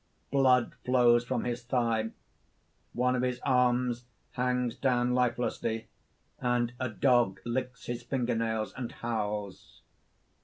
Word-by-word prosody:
Blood 130 Hz, -3 st, +4 dB
flows 120 Hz, -2 st, +4 dB
from -, -, -1 dB
his 120 Hz, 0 st, -2 dB
thigh. 115 Hz, -2 st, 0 dB, 0.8 s
One 125 Hz, +1 st, +2 dB
of 125 Hz, -, 0 dB
his 125 Hz, 0 st, -1 dB
arms 125 Hz, -2 st, +2 dB, 0.3 s
hangs 125 Hz, -1 st, 0 dB
down 125 Hz, -2 st, +1 dB
lifelessly; 115 Hz, -2 st, -1 dB, 0.5 s
and 120 Hz, -1 st, 0 dB
a 130 Hz, -, -1 dB
dog 120 Hz, -3 st, +2 dB
licks 125 Hz, +1 st, -3 dB
his 120 Hz, 0 st, -4 dB
finger 120 Hz, 0 st, -1 dB
nails 110 Hz, -1 st, -1 dB
and 125 Hz, -2 st, -5 dB
howls. 105 Hz, -6 st, -4 dB
120 Hz, 120 wpm, -30 LUFS, 115-125 Hz, 0.8 s, Blood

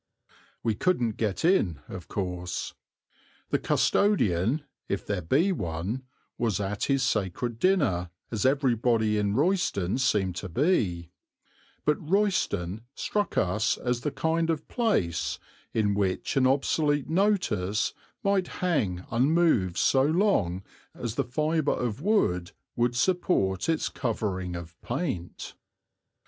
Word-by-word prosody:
We 115 Hz, -, +1 dB
couldn't 120 Hz, -, 0 dB
get 110 Hz, -, -1 dB
in, 100 Hz, -, +3 dB
of -, -, -8 dB
course. 90 Hz, -2 st, -4 dB, 0.8 s
The -, -, +2 dB
custodian, 135 Hz, -, +2 dB, 0.3 s
if 100 Hz, -, -2 dB
there 100 Hz, -3 st, -2 dB
be 145 Hz, -, +2 dB
one, 95 Hz, -, -3 dB, 0.3 s
was 110 Hz, -6 st, 0 dB
at 100 Hz, 0 st, -2 dB
his 135 Hz, -1 st, +1 dB
sacred 115 Hz, 0 st, -1 dB
dinner, 140 Hz, -, +2 dB, 0.2 s
as 110 Hz, -3 st, -1 dB
everybody 120 Hz, -5 st, +2 dB
in 100 Hz, 0 st, 0 dB
Royston 135 Hz, -, +1 dB
seemed 95 Hz, -8 st, +1 dB
to 95 Hz, -, -5 dB
be; 90 Hz, -, +1 dB, 0.7 s
but 150 Hz, 0 st, +2 dB
Royston 115 Hz, -, +1 dB
struck 205 Hz, -1 st, -2 dB
us 95 Hz, +5 st, +1 dB
as 125 Hz, -1 st, -1 dB
the 150 Hz, -, -1 dB
kind 165 Hz, +2 st, 0 dB
of 155 Hz, -2 st, -1 dB
place 150 Hz, -, 0 dB, 0.3 s
in 105 Hz, -2 st, +1 dB
which 100 Hz, -2 st, -1 dB
an 130 Hz, -1 st, +4 dB
obsolete 145 Hz, +1 st, +1 dB
notice 165 Hz, -, +1 dB, 0.3 s
might 200 Hz, -2 st, +2 dB, 0.2 s
hang 100 Hz, -, 0 dB
unmoved 125 Hz, -, +3 dB
so 135 Hz, -, +4 dB
long 140 Hz, -, +2 dB, 0.3 s
as 120 Hz, -3 st, -4 dB
the -, -, 0 dB
fibre 155 Hz, +4 st, 0 dB
of 120 Hz, +1 st, -3 dB
wood 120 Hz, -, +1 dB, 0.2 s
would 120 Hz, +1 st, +1 dB
support 130 Hz, -, +1 dB
its 160 Hz, -1 st, +1 dB
covering 95 Hz, -, -2 dB
of 85 Hz, 0 st, -9 dB
paint. 120 Hz, -, -4 dB
120 Hz, 125 wpm, -27 LUFS, -, 0.8 s, an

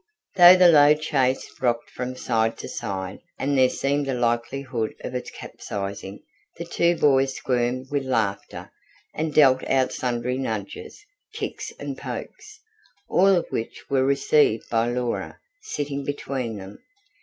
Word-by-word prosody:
Though 180 Hz, 0 st, +9 dB
the 180 Hz, -1 st, +6 dB
low 150 Hz, -1 st, +7 dB
chaise 135 Hz, -4 st, 0 dB, 0.2 s
rocked 120 Hz, -2 st, 0 dB
from 125 Hz, 0 st, -5 dB
side 115 Hz, -3 st, 0 dB
to -, -, -7 dB
side 95 Hz, -1 st, -5 dB, 0.2 s
and 140 Hz, +1 st, -1 dB
there 130 Hz, -1 st, +5 dB
seemed 140 Hz, +2 st, -1 dB
a 135 Hz, -, -1 dB
likelihood 120 Hz, 0 st, -2 dB
of -, -, -6 dB
it 125 Hz, -, -4 dB
capsizing, 100 Hz, 0 st, -7 dB, 0.3 s
the 170 Hz, -, -5 dB
two 170 Hz, 0 st, +1 dB
boys 135 Hz, -3 st, +3 dB
squirmed 125 Hz, +1 st, -2 dB
with 140 Hz, -2 st, -1 dB
laughter, 110 Hz, -6 st, -2 dB, 0.4 s
and 155 Hz, 0 st, -2 dB
dealt 135 Hz, -3 st, +5 dB
out 130 Hz, -1 st, +2 dB
sundry 125 Hz, +1 st, -2 dB
nudges, 110 Hz, -, -6 dB, 0.3 s
kicks -, -, -5 dB
and -, -, -5 dB
pokes, 435 Hz, 0 st, -8 dB, 0.5 s
all 190 Hz, -, +4 dB
of 175 Hz, -, 0 dB
which 115 Hz, -, -4 dB
were 135 Hz, -1 st, +3 dB
received 140 Hz, -3 st, +2 dB
by 115 Hz, 0 st, +1 dB
Laura, 120 Hz, -1 st, -3 dB, 0.2 s
sitting 145 Hz, -, -4 dB
between 135 Hz, -5 st, -4 dB
them. 95 Hz, +1 st, -10 dB
130 Hz, 145 wpm, -24 LUFS, 120-145 Hz, 0.5 s, Though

